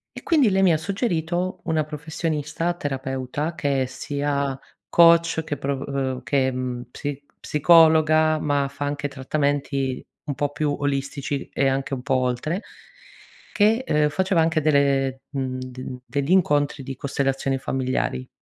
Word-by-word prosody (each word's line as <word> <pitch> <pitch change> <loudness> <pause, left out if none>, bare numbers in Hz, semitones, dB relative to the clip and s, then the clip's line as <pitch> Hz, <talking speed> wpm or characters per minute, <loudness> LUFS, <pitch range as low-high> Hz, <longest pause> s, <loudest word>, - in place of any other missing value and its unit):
E - - -8
quindi 295 -9 +4
lei 195 0 +2
mi 180 -3 +5
ha - - +2
suggerito 180 -1 -2
una 160 -2 +1
professionista 155 +2 -3
terapeuta 135 0 -3
che 140 -4 0
è - - -1
sia 140 0 -2 0.3
coach, 170 -1 +5
che 150 - -2
pro 135 0 -2
uhm, 130 -2 -2
che 130 +2 +1 0.4
psi 145 +2 -5 0.2
psicologa, 155 0 +5
ma 145 -2 +1
fa 145 +1 -5
anche 145 +1 -2
trattamenti 140 -1 -1 0.2
un 145 - -2
po' 145 +2 0
più 150 0 -1
olistici 140 0 -2
e 135 - +2
anche 135 +1 -2
un 130 - -3
po' 135 +1 0
oltre, 130 - -1 0.9
che, 220 +4 +3
ehm, 150 -8 +2
faceva 185 +2 +1
anche 160 0 +2
delle, 140 -3 +2
mhmm, 130 -2 -3
de 130 0 -7
degli 140 +3 -2
incontri 145 -6 +2
di 135 0 -6
costellazioni 135 0 -1
familiari. 130 - -2
145 Hz, 145 wpm, -23 LUFS, 135-160 Hz, 0.9 s, mi